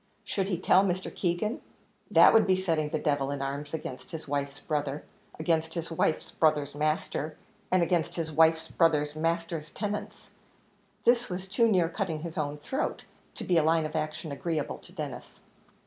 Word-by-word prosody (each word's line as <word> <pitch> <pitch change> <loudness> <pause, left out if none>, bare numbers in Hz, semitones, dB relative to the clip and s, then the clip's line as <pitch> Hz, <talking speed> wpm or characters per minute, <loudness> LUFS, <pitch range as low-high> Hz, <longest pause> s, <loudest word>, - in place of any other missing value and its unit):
Should 195 -2 -1
he 180 - 0
tell 185 +2 +5
Mr. 185 -1 -2
Keegan? 205 - -1 0.5
that - - +7
would 225 - +5
be 185 -1 +3
setting 160 -5 0
the 155 - -1
devil 145 -3 0
in 140 0 -3
arms 140 +2 -4
against 150 -5 -6
his 160 -2 -7
wife's 140 -1 -2
brother 145 -1 -2 0.3
against 160 0 0
his 165 -1 -4
wife's 160 -1 0
brother's 150 -3 +2
master 155 0 -1 0.3
and 185 -1 +4
against 170 -1 0
his 165 -2 -3
wife's 160 +1 +4
brother's 150 -3 +2
master's 165 -1 -1
tenants; 210 -1 -5 0.7
this 240 -1 +4
was 185 +1 -4
too 230 +4 +3
near 185 -6 +3
cutting 165 -3 -3
his 165 0 -6
own 145 -1 -2
throat, 265 - -3 0.3
to - - -6
be 180 - +2
a - - +2
line 160 0 +3
of 155 +1 -5
action 155 0 -3
agreeable 160 0 -2
to - - -16
Denis. - - -7
160 Hz, 175 wpm, -29 LUFS, 150-180 Hz, 0.7 s, that